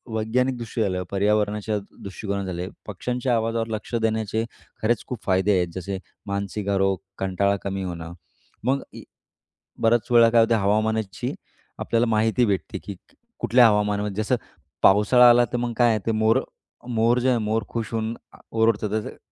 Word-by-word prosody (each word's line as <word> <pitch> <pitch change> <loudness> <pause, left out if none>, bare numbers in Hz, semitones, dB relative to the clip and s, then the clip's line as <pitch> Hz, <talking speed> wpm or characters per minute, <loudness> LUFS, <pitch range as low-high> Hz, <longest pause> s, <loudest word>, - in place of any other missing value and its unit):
वैज्ञानिकदृष्टी 120 +1 -1
झालं, 95 -3 0
पर्यावरणाच्या 105 +1 +1 0.3
दृष्टिकोनं 100 0 -4
झाले, 90 -1 -4 0.2
पक्ष्यांच्या 125 +5 -1
आवाजावर 115 0 -1
लक्ष 110 +1 -4
देण्याचे 110 -1 0 0.4
खरेच 110 0 +1
खूप 125 -4 -6
फायदे 95 +1 +2
आहेत. 90 -1 +1
जसे 95 +1 -4 0.3
मानसिक 100 +1 -3
आरोग, 95 -1 +2 0.2
कंटाळा 95 +1 +1
कमी 95 0 -3
होणं. 85 -2 -6 0.5
मग 135 +1 +1
या, - - -10 0.8
"बऱ्याच 115 0 +3
वेळा" 115 -1 +7
काय 115 0 +5
होतं, 115 0 +3
हवामानाची 110 0 0 0.5
आपल्याला 115 +1 +1
माहिती 110 +2 +2
भेटते 100 -4 -2
की 100 - -6
क - - -29 0.3
कुठल्या 120 -1 +5
हवामानामध्ये, 105 0 0
जसं 125 - +1 0.5
पावसाळा 120 +5 +6
आला 120 0 +6
तर, - - +1
मग 120 0 -2
काय 120 -2 +4
आहे, 110 +2 -2
मोर 110 +1 +3 0.5
मोर 120 0 +2
जे 130 +1 +1
आहेत 120 - +2
मोर 110 +1 0
खुश 115 -2 -3
होऊन 110 0 -2 0.2
अ, - - -15
ओरडतात. 110 -2 +1
जसे 110 +1 -3
110 Hz, 155 wpm, -24 LUFS, 100-115 Hz, 0.8 s, वेळा